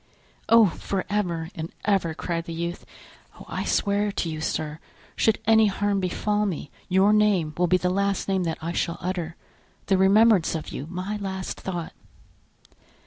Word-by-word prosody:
"Oh! 230 -1 +8
for 190 +1 -2
ever 170 -6 -1
and 160 -2 -6
ever!" 190 -6 +1
cried 165 0 -3
the 165 - -6
youth; 170 +1 -4 0.5
"oh! - - -11
I - - -3
swear 205 0 +1
to 175 - -2
you, 155 -1 -4
sir, 155 -1 -3 0.4
should 220 - +3
any 220 0 +5
harm 200 0 0
befall 210 +3 0
me, 165 -6 -4 0.2
your 190 +3 +4
name 200 -7 +3
will 180 0 +2
be 185 +2 +4
the 180 0 0
last 200 0 0
name 190 -1 +1
that 165 - -2
I 165 - -2
shall 170 0 -1
utter, 175 -3 -3 0.5
the 195 -2 +2
remembrance 200 -2 +5
of 160 - -4
you 145 - -6
my 185 +4 -4
last 190 -2 -4
thought." 175 -3 -4
185 Hz, 170 wpm, -25 LUFS, 170-205 Hz, 0.5 s, Oh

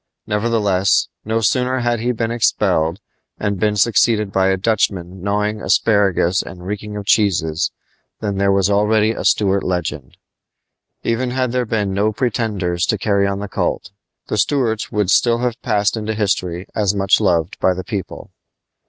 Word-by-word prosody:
Nevertheless, 105 -3 +1
no 110 +1 -1
sooner 125 +4 +1
had 120 -1 0
he 120 +2 0
been 115 -1 -2
expelled, 85 -7 +1 0.4
and 100 -2 -2
been 105 -1 +1
succeeded 105 -1 +2
by 95 0 +2
a 95 0 +2
Dutchman 95 -3 -1
gnawing 105 +2 -1
asparagus 100 -3 +2
and 90 -1 -10
reeking 105 +1 -5
of 100 - -6
cheeses, 95 -5 +1 0.5
than 100 -2 -3
there 100 0 +3
was 95 -1 +2
already 105 +2 +2
a - - -5
Stuart 100 -1 +2
legend. 80 -7 -4 0.9
Even 120 +2 0
had 130 -1 -1
there 125 -1 -1
been 105 -3 -1
no 105 +2 +1
pretenders 105 -7 -1
to 110 - +1
carry 100 -1 +1
on 100 0 -3
the 105 - -4
cult, 100 - -2 0.3
the 105 - -2
Stuarts 115 -4 0
would 105 -3 0
still 115 +2 +3
have 120 -1 -2
passed 105 -3 +1
into 110 0 -3
history 95 -4 -1
as 105 -2 0
much 95 -1 +3
loved 85 -3 0
by 95 - +2
the 95 - -5
people. 100 -2 -6
105 Hz, 160 wpm, -19 LUFS, 95-110 Hz, 0.9 s, there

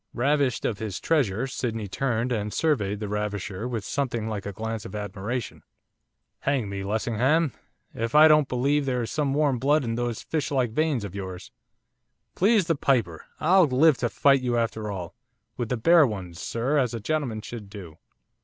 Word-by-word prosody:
Ravished 140 -1 +1
of 105 -3 -1
his 105 -5 -4
treasure, 130 -8 +1
Sydney 115 -5 -3
turned 120 +3 -1
and 105 -3 -1
surveyed 105 -11 0
the 105 - -4
ravisher 105 0 -3
with 115 -5 -4
something 120 -6 -2
like 105 -2 -4
a - - -3
glance 110 +1 -4
of 95 - -8
admiration. 105 +3 -4 0.8
'Hang 130 -7 0
me, 100 0 -4
Lessingham, 120 +9 +1 0.4
if 115 +3 -3
I 155 +1 +9
don't 150 -2 +5
believe 140 +3 +1
there 125 -2 0
is 115 - -5
some 145 -3 0
warm 145 -4 +2
blood 145 +3 +3
in 115 -2 -2
those 120 -1 -3
fishlike 140 -6 -1
veins 150 -2 0
of 100 -3 -6
yours. 95 -2 -7 0.8
Please 205 0 +3
the 165 - +2
piper, 120 - 0
I'll 180 +2 +5
live 140 +2 +4
to 120 - -1
fight 135 +3 +3
you 120 -1 0
after 110 -2 -2
all, 90 -4 -5 0.4
with 120 -2 -3
the 125 - 0
bare 165 +5 +6
ones, 90 -6 -6
sir, 130 +6 0
as 125 -3 0
a - - -4
gentleman 125 -3 -2
should 105 -3 -8
do. 95 -6 -10
120 Hz, 180 wpm, -26 LUFS, 105-140 Hz, 0.8 s, I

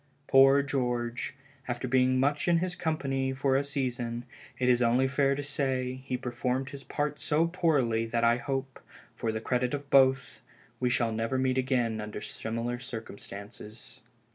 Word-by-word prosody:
Poor 135 +1 +6
George, 125 -3 -2 0.3
after 120 +1 -3
being 130 0 +3
much 145 +4 +1
in 170 -1 +5
his 180 +1 -1
company 135 -5 -1
for 135 0 +1
a 135 - +3
season, 125 -4 -2 0.3
it 125 - 0
is 125 -1 +4
only 125 +2 +3
fair 135 +1 +2
to 145 - -4
say, 130 -2 -1
he 130 -1 -2
performed 125 +1 -2
his 140 -1 -8
part 145 +1 -2
so 155 +2 +2
poorly 145 -10 +1
that 115 +1 0
I 115 0 +4
hope, 135 0 -4 0.4
for 115 - -1
the 110 - -3
credit 125 +3 0
of 140 0 -8
both, 135 0 +4 0.4
we 125 - +1
shall 120 -2 +1
never 115 +4 -1
meet 130 0 +1
again 120 -4 0
under 105 0 -6
similar 115 +3 -4
circumstances. 110 -2 -8
130 Hz, 165 wpm, -29 LUFS, 120-135 Hz, 0.4 s, Poor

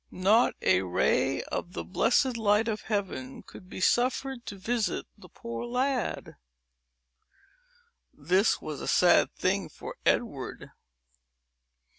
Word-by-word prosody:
Not 205 +6 +3
a 95 0 +4
ray 90 -2 +1
of 175 - -5
the - - -4
blessed 240 +5 +1
light 220 0 +2
of 215 -2 -2
Heaven 230 +5 -4
could 185 - -14
be - - -7
suffered 255 +4 0
to 205 - -5
visit 220 +3 -2
the - - -16
poor 235 -1 -7
lad. 250 +1 -2 1.7
This 185 +8 +1
was 155 -2 -6
a - - -5
sad 175 -1 +4
thing 185 -2 0
for - - -9
Edward! - - -1
215 Hz, 120 wpm, -28 LUFS, 185-240 Hz, 1.7 s, a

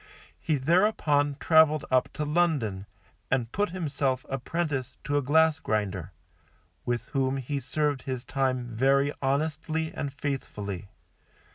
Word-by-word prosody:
He 155 - 0
thereupon 145 -2 +2
traveled 160 -2 +5
up 130 0 +3
to 150 - -2
London, 145 - 0 0.4
and 125 -3 0
put 205 +1 0
himself 145 -7 -1
apprentice 135 0 -2
to 145 - -1
a 145 - +3
glass 160 +3 +3
grinder, 100 - -2 0.8
with 120 -1 -2
whom 135 -1 0
he 140 +2 -3
served 145 +1 -1
his 130 -2 -4
time 130 -3 0
very 135 +5 +2
honestly 155 +3 -1
and 140 - -3
faithfully. 105 -9 -4
140 Hz, 125 wpm, -28 LUFS, 130-155 Hz, 0.8 s, traveled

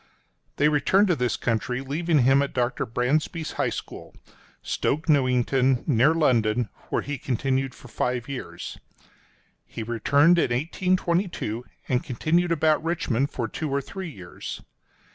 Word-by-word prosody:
— - - -44
They 145 - +4
returned 185 +7 +3
to 175 - +3
this 125 -3 0
country, 125 +2 -1
leaving 150 +2 +1
him 135 +2 +5
at 140 - -3
Dr. 125 -1 0
Brandsby's 150 +8 -1
High - - 0
School, - - -8 0.5
Stoke 155 +3 -1
Newington, 130 -2 +2
near 145 +3 +4
London, 120 -7 +2 0.2
where - - 0
he 145 -2 -4
continued 130 +1 -1
five 120 +1 -3
years. 140 -2 -7 0.8
He 115 - -7
returned 140 +9 +3
in - - +2
1822, 170 - -1 0.2
and 125 -1 +1
continued 170 +8 0
about 155 -1 +2
Richmond 145 -6 0
for 120 -6 -3
two 155 +7 -4
or 140 +1 +1
three 185 +6 -6
years. 90 - -8
135 Hz, 140 wpm, -25 LUFS, 125-160 Hz, 0.8 s, him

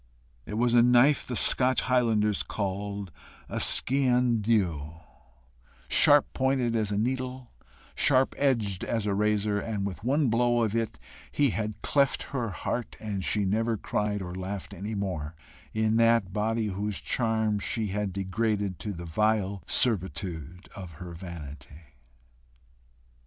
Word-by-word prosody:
It 105 - -5
was 120 +1 +1
a 120 - +6
knife 125 +4 +4
the 125 - -3
Scotch 130 +2 +4
highlanders 110 -5 +1
call 100 0 -4 0.4
a - - -4
skean 125 -3 +4
dhu, 85 -9 0 0.9
sharp 145 -1 +5
pointed 130 -3 0
as 105 -2 0
a 100 - -1
needle, 130 +2 -3 0.4
sharp 130 -1 +2
edged 115 -9 0
as 115 -3 -2
a 100 - 0
razor, 105 0 +1
and 105 -2 -3
with 100 +1 -6
one 140 +4 +2
blow 120 +1 +2
of 110 0 -1
it 115 -1 -2 0.3
he 145 -4 +2
had 110 -1 -4
cleft 140 -1 +1
her 120 -4 -1
heart, 115 +5 -4
and 100 -3 -4
she 105 +1 +1
never 110 +3 0
cried 105 0 -2
or 90 -1 -7
laughed 95 +2 -6
any 100 +4 -5
more 85 -6 -4 0.4
in 110 0 +1
that 115 -5 +3
body 110 +1 -1
whose 100 0 -3
charms 110 -3 0
she 110 -3 -1
had 105 0 -2
degraded 100 0 -2
to 105 - -4
the 85 -1 -8
vile 100 +2 0
servitude 90 - -2
of 90 -4 -9
her 90 +2 -9
vanity. 80 -3 -10
105 Hz, 140 wpm, -27 LUFS, 95-120 Hz, 0.9 s, a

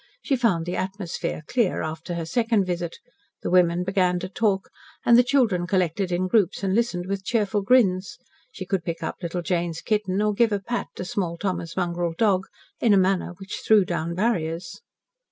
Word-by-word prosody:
She 275 - +1
found 210 -10 +1
the 175 - -3
atmosphere 190 -4 -4
clear 235 -2 0
after 160 +2 -5
her 165 -1 -3
second 225 +2 +1
visit. 175 -2 -3 0.5
The - - -2
women 180 -1 +4
began 185 -1 +1
to 185 - -5
talk, 195 -1 0 0.3
and 235 - +7
the 245 - +8
children 230 -10 +2
collected 185 0 0
in 180 +1 0
groups 200 -1 +2
and 190 -1 +1
listened 205 -6 0
with 195 0 -3
cheerful 210 -1 0
grins. 195 -5 +2 0.3
She 185 - -7
could 185 -2 -1
pick 165 -1 -4
up 160 - -3
little 175 0 -3
Jane's 170 -1 -1
kitten, 210 -3 0
or 210 0 +2
give 225 +2 +3
a 205 - +1
pat 240 +5 -3
to 180 - -5
small 180 -3 -2
Thomas' 175 -3 -3
mongrel 175 -2 -1
dog, 195 -4 +2 0.3
in 220 -4 +4
a - - +5
manner 185 -2 +1
which 195 +1 -7
threw 215 -3 +5
down 170 -1 -2
barriers. 170 -5 -1
185 Hz, 190 wpm, -24 LUFS, 175-210 Hz, 0.5 s, the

